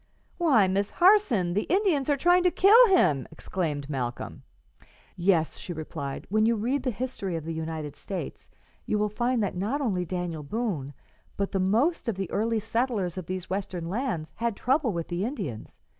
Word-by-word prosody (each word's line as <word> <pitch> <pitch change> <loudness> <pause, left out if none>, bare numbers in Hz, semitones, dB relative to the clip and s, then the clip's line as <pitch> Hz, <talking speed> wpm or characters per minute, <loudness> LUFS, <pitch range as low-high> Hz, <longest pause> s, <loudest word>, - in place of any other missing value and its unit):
"Why, 265 - +4
Miss 195 +2 0
Harson, 345 - +4
the 205 - -1
Indians 345 -7 +2
are 285 - +3
trying 350 +5 +4
to - - +6
kill 435 +8 +7
him!" 155 - +3
exclaimed 150 -6 -3
Malcolm. 125 -4 -4 0.7
"Yes," 170 -3 +1
she 175 - -6
replied; 155 -3 -6
"when 215 +1 +3
you 230 - +3
read 245 +6 0
the 255 - -1
history 225 -6 -4
of 160 -2 -5
the 165 - -3
United 160 -2 -5
States, 195 - -6 0.4
you 210 - +1
will 210 0 +1
find 240 +2 0
that 200 - -2
not 210 +10 -1
only 200 -10 0
Daniel 175 -2 -4
Boone, 150 - -3 0.4
but 200 0 -1
the 195 - 0
most 235 - +1
of 230 - 0
the 195 -2 -4
early 225 +2 +1
settlers 225 -4 -1
of 185 -3 -6
these 185 -1 -4
Western 185 -3 -3
lands, 185 - -3
had 230 -1 -1
trouble 265 +3 +1
with 170 -3 -3
the 175 +2 -2
Indians. 195 - -5
200 Hz, 180 wpm, -27 LUFS, 170-250 Hz, 0.7 s, kill